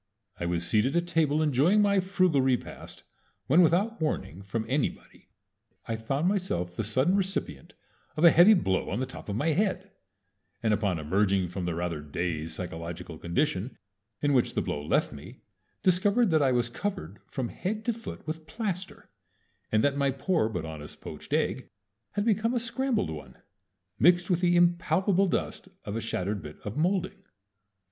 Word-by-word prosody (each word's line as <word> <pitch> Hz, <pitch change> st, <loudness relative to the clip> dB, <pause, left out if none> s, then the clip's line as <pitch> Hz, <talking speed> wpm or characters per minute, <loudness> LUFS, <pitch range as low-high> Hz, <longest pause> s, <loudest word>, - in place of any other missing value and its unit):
I 85 Hz, -, -2 dB
was 85 Hz, -1 st, -1 dB
seated 110 Hz, -, +2 dB
at 170 Hz, 0 st, +2 dB
table 155 Hz, -3 st, +2 dB
enjoying 155 Hz, +8 st, +3 dB
my 200 Hz, -1 st, +4 dB
frugal 185 Hz, -6 st, +2 dB
repast, 130 Hz, -1 st, -2 dB, 0.4 s
when 160 Hz, +7 st, +5 dB
without 180 Hz, +6 st, +2 dB
warning 95 Hz, -, -2 dB
from 105 Hz, +3 st, -3 dB
anybody 135 Hz, +3 st, -3 dB, 0.6 s
I 115 Hz, -, -1 dB
found 135 Hz, +9 st, -1 dB
myself 180 Hz, -, -1 dB
the 110 Hz, -, -2 dB
sudden 130 Hz, -, +2 dB
recipient 190 Hz, -, -3 dB, 0.4 s
of 155 Hz, -, 0 dB
a 170 Hz, -, +9 dB
heavy 190 Hz, +6 st, +7 dB
blow 95 Hz, -, 0 dB
on 100 Hz, -, -2 dB
the 130 Hz, -, 0 dB
top -, -, -10 dB
of 100 Hz, -, -2 dB
my 145 Hz, +9 st, +1 dB
head, 190 Hz, +3 st, 0 dB, 0.7 s
and 110 Hz, -1 st, +3 dB
upon 100 Hz, -4 st, 0 dB
emerging 95 Hz, +3 st, +1 dB
from 90 Hz, 0 st, -4 dB
the 85 Hz, -2 st, -2 dB
rather 85 Hz, -3 st, -3 dB
dazed 80 Hz, +1 st, -3 dB
psychological 85 Hz, -2 st, -6 dB
condition 100 Hz, -, -1 dB, 0.5 s
in 145 Hz, -1 st, +3 dB
which 125 Hz, -3 st, +2 dB
the -, -, +2 dB
blow 75 Hz, -, -3 dB
left -, -, +1 dB
me -, -, -11 dB, 0.4 s
discovered 200 Hz, +4 st, +3 dB
that 155 Hz, -1 st, +4 dB
I 135 Hz, -2 st, +3 dB
was 120 Hz, -1 st, +1 dB
covered 120 Hz, -, -5 dB
from 125 Hz, -4 st, -3 dB
head 215 Hz, +4 st, -4 dB
to 240 Hz, -, +1 dB
foot 230 Hz, +1 st, -9 dB
with 160 Hz, 0 st, -6 dB
plaster, 195 Hz, -2 st, -5 dB, 0.6 s
and 110 Hz, 0 st, +3 dB
that 140 Hz, 0 st, +2 dB
my 140 Hz, -1 st, +2 dB
poor 135 Hz, -, 0 dB
but 90 Hz, -7 st, -4 dB
honest 80 Hz, -2 st, -9 dB
poached -, -, -10 dB
egg -, -, 0 dB, 0.4 s
had 205 Hz, 0 st, -1 dB
become 230 Hz, +2 st, +1 dB
a -, -, +2 dB
scrambled 235 Hz, -, -1 dB
one, 70 Hz, -5 st, -9 dB, 0.6 s
mixed 175 Hz, +4 st, +4 dB
with 175 Hz, 0 st, +2 dB
the 175 Hz, -1 st, +3 dB
impalpable 175 Hz, +3 st, +3 dB
dust -, -, -2 dB, 0.2 s
of 105 Hz, -, -4 dB
a 115 Hz, -, -2 dB
shattered 100 Hz, -2 st, -2 dB
bit 75 Hz, 0 st, -10 dB
of 105 Hz, -, -6 dB
molding. 185 Hz, +4 st, 0 dB
140 Hz, 170 wpm, -28 LUFS, -, 0.7 s, a